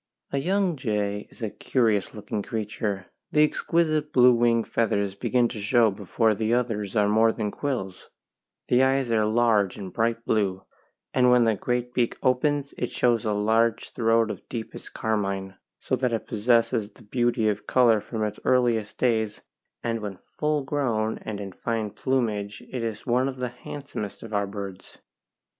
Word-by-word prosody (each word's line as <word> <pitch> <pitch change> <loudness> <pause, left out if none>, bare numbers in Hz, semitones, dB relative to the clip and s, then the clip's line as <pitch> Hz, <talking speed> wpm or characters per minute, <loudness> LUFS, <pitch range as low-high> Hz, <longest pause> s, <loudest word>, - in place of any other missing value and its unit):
A 140 - 0
young 185 +1 +1
jay 105 -4 -2
is - - -11
a 110 - -2
curious 110 -7 0
looking 105 0 -4
creature: 105 -2 -3 0.3
the 150 - +5
exquisite 155 -1 +1
blue 125 -2 +6
wing 115 -1 +3
feathers 100 -4 0
begin 120 +4 +1
to 110 - -6
show 115 +1 +4
before 110 +3 +1
the 110 +2 +1
others 110 -5 -2
are 105 -2 +4
more 110 +2 +4
than 105 -2 -3
quills; 120 -10 -4 0.6
the 125 +1 +4
eyes 130 -2 +2
are 110 -2 +3
large 110 -4 +2
and 95 -3 -7
bright 115 0 0
blue, 95 -3 0 0.5
and 125 -1 +4
when 125 -1 +5
the 115 -1 +3
great 125 +4 -2
beak 120 -2 0
opens 140 +2 +1
it - - -1
shows 120 -3 +1
a 110 - +1
large 110 +2 +1
throat 115 -1 +2
of - - -10
deepest 115 -2 -7
carmine, 100 -3 -1 0.2
so - - -1
that 125 -1 0
it 115 - -2
possesses 115 -1 +2
the 115 +3 -19
beauty 120 0 +1
of 105 0 -1
colour 115 -4 +4
from 110 0 -4
its 105 0 -3
earliest 120 -4 +1
days, 110 -4 0 0.4
and 115 -1 -1
when 100 -3 -5
full 150 +5 -2
grown 120 -6 -1
and 105 -2 -6
in 100 -1 -6
fine 110 +2 -3
plumage 105 -4 -1
it 125 - -3
is 115 -2 -4
one 125 +1 +2
of 135 -1 -4
the 125 -1 -2
handsomest 125 -4 -7
of 110 -1 -9
our 100 -1 +1
birds. 100 -2 -8
115 Hz, 170 wpm, -26 LUFS, 105-125 Hz, 0.6 s, blue